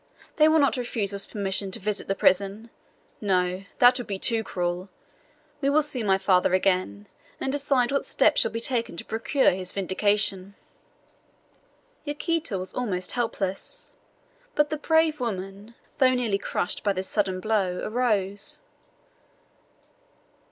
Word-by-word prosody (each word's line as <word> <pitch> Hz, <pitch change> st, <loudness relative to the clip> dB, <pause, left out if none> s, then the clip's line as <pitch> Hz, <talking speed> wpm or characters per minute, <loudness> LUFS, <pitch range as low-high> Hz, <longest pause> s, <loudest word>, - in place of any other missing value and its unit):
They 305 Hz, -1 st, +6 dB
will 315 Hz, +1 st, +4 dB
not 280 Hz, -3 st, +3 dB
refuse 225 Hz, -5 st, -2 dB
us 200 Hz, 0 st, +2 dB
permission 195 Hz, -1 st, -2 dB
to 190 Hz, -, -3 dB
visit 210 Hz, 0 st, -2 dB
the 195 Hz, -, 0 dB
prison. 200 Hz, +5 st, +1 dB, 0.5 s
No! 185 Hz, -2 st, 0 dB
that 250 Hz, +1 st, +6 dB
would 245 Hz, -, -6 dB
be 195 Hz, -, -3 dB
too 225 Hz, +3 st, +2 dB
cruel. 180 Hz, 0 st, -3 dB, 0.7 s
We 275 Hz, -, +2 dB
will 300 Hz, +2 st, +3 dB
see 280 Hz, -4 st, -3 dB
my 195 Hz, -3 st, +2 dB
father 185 Hz, -1 st, +3 dB
again, 180 Hz, -, 0 dB, 0.3 s
and 265 Hz, -, -2 dB
decide 275 Hz, -3 st, +1 dB
what 275 Hz, -, -1 dB
steps -, -, +3 dB
shall -, -, +4 dB
be 230 Hz, -, -4 dB
taken 235 Hz, -5 st, -1 dB
to -, -, -6 dB
procure 260 Hz, +5 st, +1 dB
his 185 Hz, 0 st, -3 dB
vindication." 200 Hz, 0 st, 0 dB, 1.5 s
Yaquita 305 Hz, -, -2 dB
was 185 Hz, 0 st, -6 dB
almost 185 Hz, -8 st, -2 dB
helpless, 205 Hz, -6 st, -2 dB, 0.6 s
but 295 Hz, 0 st, +2 dB
the 310 Hz, -, -1 dB
brave 320 Hz, 0 st, +2 dB
woman, 200 Hz, -1 st, -5 dB, 0.2 s
though 255 Hz, -1 st, +5 dB
nearly 225 Hz, -5 st, 0 dB
crushed 180 Hz, -, -2 dB
by 200 Hz, -, +2 dB
this 190 Hz, 0 st, -4 dB
sudden 195 Hz, -3 st, -1 dB
blow, 190 Hz, -3 st, 0 dB
arose. 210 Hz, -4 st, 0 dB
205 Hz, 145 wpm, -25 LUFS, 190-250 Hz, 1.5 s, They